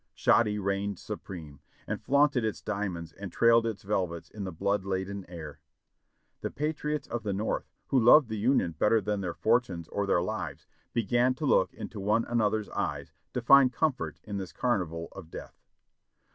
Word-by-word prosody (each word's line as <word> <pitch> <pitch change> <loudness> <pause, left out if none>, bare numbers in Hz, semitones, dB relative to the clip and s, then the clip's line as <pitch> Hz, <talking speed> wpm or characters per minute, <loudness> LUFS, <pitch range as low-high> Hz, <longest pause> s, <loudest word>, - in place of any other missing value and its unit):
Shoddy 105 -3 +3
reigned 100 0 -1
supreme, 80 -8 -8 0.3
and - - -4
flaunted 140 -2 +3
its 110 -1 -2
diamonds 90 -5 -3
and 100 -2 -8
trailed 115 +2 +4
its 110 -3 -4
velvets 90 -4 -2
in 105 -2 -6
the 95 - -4
blood 100 +4 0
laden 95 0 -3
air. 80 -4 -9 0.8
The - - -2
patriots 150 0 -2
of 120 0 -3
the 105 -2 -2
North, 105 +3 -2 0.2
who 135 - +4
loved 125 +4 +7
the 110 -1 -4
Union 115 -6 +2
better 105 +8 +3
than 105 0 -2
their 90 -3 -3
for 115 +2 +4
tunes 85 -8 -8
or 100 0 -2
their 85 -3 +3
lives, 95 -4 -4 0.3
began 120 +3 +2
to 150 - -4
look 95 - +3
into 105 - -7
one 105 +4 +1
another's 110 -2 0
eyes - - -3 0.2
to 125 - -1
find 135 0 +7
comfort 150 0 -1
in 105 -2 -5
this 95 -2 -5
carnival 85 -9 -1
of 90 -5 -10
death. - - -10
105 Hz, 175 wpm, -29 LUFS, 95-120 Hz, 0.8 s, loved